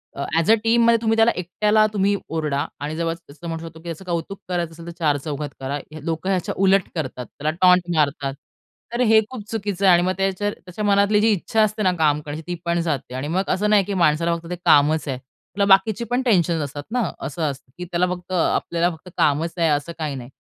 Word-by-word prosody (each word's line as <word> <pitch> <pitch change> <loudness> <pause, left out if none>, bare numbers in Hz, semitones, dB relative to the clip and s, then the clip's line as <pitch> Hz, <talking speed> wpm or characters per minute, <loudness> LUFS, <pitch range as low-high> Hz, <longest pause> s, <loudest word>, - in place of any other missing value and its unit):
A, 140 - -3
as 165 +6 +3
a - - +8
टीममध्ये 230 0 +4
तुम्ही 225 -1 +2
त्याला 225 +1 +5
एकट्याला 210 +4 +2
तुम्ही 200 0 +2
ओरडा 150 -3 -1
आणि 150 +2 -4
जेव्हा 165 0 -1 0.2
असं 155 +4 -10
म्हणू 165 0 -4
शकतो, 160 0 -12
की 160 - -19
त्याचं 170 +2 -6
कौतुक 175 +3 -3
करायचं 175 -2 -1
असेल, 165 +1 -12
तर - - -5
चारचौघात 145 -1 -1
करा. 135 +2 -3 0.2
हे 155 -1 -9
लोक 165 +2 -3
ह्याच्या 185 -3 -1
उलट 195 0 +4
करतात. 130 -5 -4
त्याला 150 +7 -3
टॉन्ट 180 -1 +5
मारतात. 140 -2 0 0.6
तर 240 - 0
हे 220 -2 +6
खूप 250 -5 -7
चुकीचं 200 -3 -2
आहे 185 - +7
आणि 175 - +5
मग 185 - +1
त्याच्या 195 +1 0
त्याच्या 185 +1 -8
मनातली 200 +1 +4
जी 225 - +4
इच्छा 220 +4 0
असते 215 0 +1
ना 185 - +4
काम 150 -1 +3
करण्याची 150 +2 -7
ती 175 - -1
पण 170 0 +1
जाते 140 -6 -3
आणि 130 +3 -3
मग 185 +5 0
असं 210 +3 +1
नाही, 205 -2 +5
की 200 - -4
माणसाला 170 -1 +2
फक्त 170 0 -9
ते 180 - -2
कामच 150 +2 +4
आहे. 130 - -2
त्याला 185 +9 -5
बाकीची 210 +4 +2
पण 250 +2 +2
टेन्शन्स 175 -8 +2
असतात 145 +1 -6
ना. 250 +1 +1 0.2
असं 145 +4 -5
असतं, 135 -1 -13
की 180 - -5
त्याला 175 +1 0
फक्त 180 +1 -10
आपल्याला 170 0 +1
फक्त 180 +3 -14
कामच 155 +3 +1
आहे, 165 - +2
असं 145 +3 0
काही 150 -3 -2
नाही. 125 -2 -8
170 Hz, 225 wpm, -22 LUFS, 150-200 Hz, 0.6 s, A